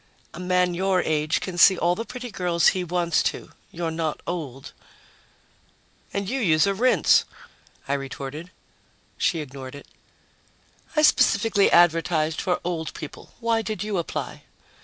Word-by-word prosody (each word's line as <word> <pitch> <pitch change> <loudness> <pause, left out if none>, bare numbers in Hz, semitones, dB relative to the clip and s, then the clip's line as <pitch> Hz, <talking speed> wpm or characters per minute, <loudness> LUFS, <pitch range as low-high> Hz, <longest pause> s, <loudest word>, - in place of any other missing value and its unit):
"A - - -9
man 180 0 +1
your 185 0 +1
age 155 0 0
can 180 -2 -5
see 190 +1 +7
all 175 +1 +2
the 225 +5 -4
pretty 250 -1 -7
girls 175 -3 +2
he 185 - -2
wants 175 -1 0
to. - - -3 0.2
You're 170 -1 -3
not 160 -1 -2
old." 140 -7 -6 1.4
"And 200 -1 -3
you 265 +6 -2
use 160 -8 +3
a 200 - +1
rinse," 250 +6 +4 0.6
I 140 - 0
retorted. 140 +4 -6 0.7
She 165 - +1
ignored 135 -2 -9
it. 140 - -11 1.1
"I 305 - +3
specifically 225 -8 +4
advertised 165 -2 +3
for 180 -2 0
old 165 -3 -4
people. 155 - -10
Why 230 -1 +1
did 215 -3 -4
you 210 -3 -2
apply?" 170 - -5
175 Hz, 145 wpm, -24 LUFS, 155-195 Hz, 1.4 s, see